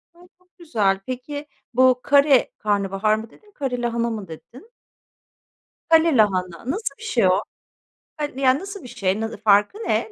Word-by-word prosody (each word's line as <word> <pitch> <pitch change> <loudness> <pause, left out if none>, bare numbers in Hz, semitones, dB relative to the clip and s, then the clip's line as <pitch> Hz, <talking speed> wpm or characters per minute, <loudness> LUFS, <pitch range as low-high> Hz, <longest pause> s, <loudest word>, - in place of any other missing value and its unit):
A! - - -22 0.2
Çok 360 +1 -36
güzel. 215 - 0
Pek,i 255 +7 -6 0.3
bu 255 0 +4
kare 280 -2 +4
karnabahar 205 0 0
mı 220 +1 -7
dedin, 420 - -22
kare 265 -8 -3
lahana 235 0 -1
mı 215 -4 -5
dedin? 240 - -13 1.2
Kale 325 -3 +4
lahana, 185 +1 +1
nasıl 380 -6 -3
bir - - -13
şey 230 -6 +2
o? 185 +2 +3 0.8
Han 295 -3 -4
yani, 265 0 +3
nasıl 395 0 -8
bir - - -9
şey, 195 -3 -1
n 225 0 -3
ne - - -8
farkı 205 - +3
ne 445 0 -1
245 Hz, 165 wpm, -22 LUFS, 205-290 Hz, 1.2 s, bu